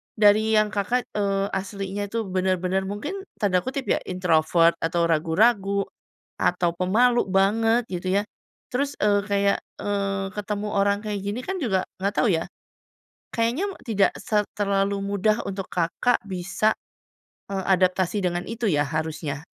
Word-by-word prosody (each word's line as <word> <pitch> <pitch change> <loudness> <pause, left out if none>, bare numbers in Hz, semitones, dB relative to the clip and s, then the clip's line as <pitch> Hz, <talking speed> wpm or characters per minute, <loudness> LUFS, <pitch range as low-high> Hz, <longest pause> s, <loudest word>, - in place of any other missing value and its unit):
dari 215 +1 +4
yang 215 0 +3
Kakak, 220 +4 0
eee, 200 -1 +1
aslinya 200 0 -3
itu 225 +2 -2
bener-bener 185 0 0
mungkin 255 - -4 0.2
tanda 195 -4 +2
kutip 270 +1 -3
ya, - - +2
Introvert 170 -2 +3
atau 170 +1 0
ragu-ragu 195 +5 +2 0.6
atau 175 -1 +2
pemalu 230 +7 +3
banget, 225 +5 +3
gitu 180 0 -4
ya. - - -6 0.5
Terus, 280 +3 -1
eee, 205 -1 +3
kayak, 200 0 +2 0.2
eee, 195 -1 -1
ketemu 210 0 -3
orang 200 0 +2
kayak 210 -1 -2
gini 205 +4 -3
kan 380 - -2
juga 190 -8 +1 0.2
nggak 200 +2 0
tau - - +3
ya, 165 -1 0 0.9
kayaknya 240 - 0 0.2
tidak 205 -5 +2
se 210 -1 +1 0.2
terlalu 200 0 +1
mudah 205 +2 +1
untuk 195 -1 -4
Kakak 180 +8 +1
bisa, 195 +3 0 0.8
eee, 195 -1 -2
adaptasi 185 0 +2
dengan 175 0 -1
itu 230 0 -3
ya, 145 -5 +3
harusnya. 155 -1 -3
200 Hz, 140 wpm, -24 LUFS, 185-215 Hz, 0.9 s, dari